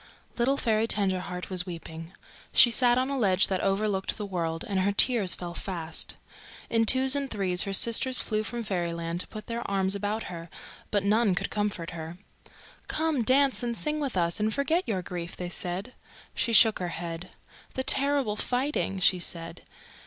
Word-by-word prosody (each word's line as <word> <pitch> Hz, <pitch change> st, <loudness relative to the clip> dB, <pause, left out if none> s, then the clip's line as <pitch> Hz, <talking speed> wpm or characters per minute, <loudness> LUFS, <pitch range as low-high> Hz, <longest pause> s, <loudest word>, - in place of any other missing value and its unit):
Little 260 Hz, +4 st, +1 dB
Fairy 220 Hz, -2 st, +1 dB
Tenderheart 185 Hz, -4 st, -1 dB
was 180 Hz, 0 st, +3 dB
weeping. 165 Hz, -1 st, -8 dB, 0.4 s
She 240 Hz, -, +7 dB
sat 240 Hz, +1 st, +3 dB
on 260 Hz, +2 st, 0 dB
a 275 Hz, -, -2 dB
ledge 190 Hz, -4 st, +4 dB
that 190 Hz, -2 st, -1 dB
overlooked 195 Hz, 0 st, -1 dB
the 210 Hz, -, -4 dB
world, 165 Hz, -4 st, -3 dB
and 195 Hz, -2 st, -1 dB
her 195 Hz, +2 st, +1 dB
tears 205 Hz, -2 st, +2 dB
fell 175 Hz, -1 st, -7 dB
fast. 170 Hz, -3 st, -2 dB, 0.6 s
In 225 Hz, -1 st, +2 dB
twos 260 Hz, +2 st, +5 dB
and 280 Hz, -1 st, -2 dB
threes 190 Hz, -5 st, 0 dB
her 200 Hz, -, -4 dB
sisters 235 Hz, +5 st, +4 dB
flew 215 Hz, -1 st, -1 dB
from 235 Hz, +2 st, -5 dB
Fairyland 170 Hz, -3 st, -3 dB
to -, -, -1 dB
put 215 Hz, -1 st, -9 dB
their 235 Hz, 0 st, -4 dB
arms 195 Hz, -1 st, +1 dB
about 205 Hz, +2 st, -2 dB
her, 170 Hz, -1 st, -8 dB, 0.4 s
but 205 Hz, -2 st, 0 dB
none 210 Hz, -1 st, +2 dB
could -, -, -3 dB
comfort 205 Hz, -5 st, -3 dB
her. 165 Hz, 0 st, -8 dB, 0.7 s
"Come, 315 Hz, -4 st, 0 dB
dance 265 Hz, +3 st, +3 dB
and 235 Hz, -1 st, -3 dB
sing 305 Hz, 0 st, -1 dB
with 275 Hz, -9 st, -3 dB
us 170 Hz, +1 st, +1 dB
and 215 Hz, +1 st, 0 dB
forget 320 Hz, +8 st, 0 dB
your 190 Hz, -5 st, -2 dB
grief," 175 Hz, 0 st, -6 dB
they 180 Hz, -1 st, -5 dB
said. 180 Hz, +6 st, -4 dB, 0.4 s
She 235 Hz, -, -1 dB
shook 225 Hz, -1 st, +5 dB
her 180 Hz, -, -3 dB
head. 170 Hz, +1 st, -6 dB, 0.5 s
"The 260 Hz, -, -1 dB
terrible 275 Hz, -5 st, +2 dB
fighting!" 245 Hz, -4 st, -1 dB
she 185 Hz, 0 st, +3 dB
said. 170 Hz, -1 st, -3 dB
200 Hz, 180 wpm, -27 LUFS, 180-235 Hz, 0.7 s, She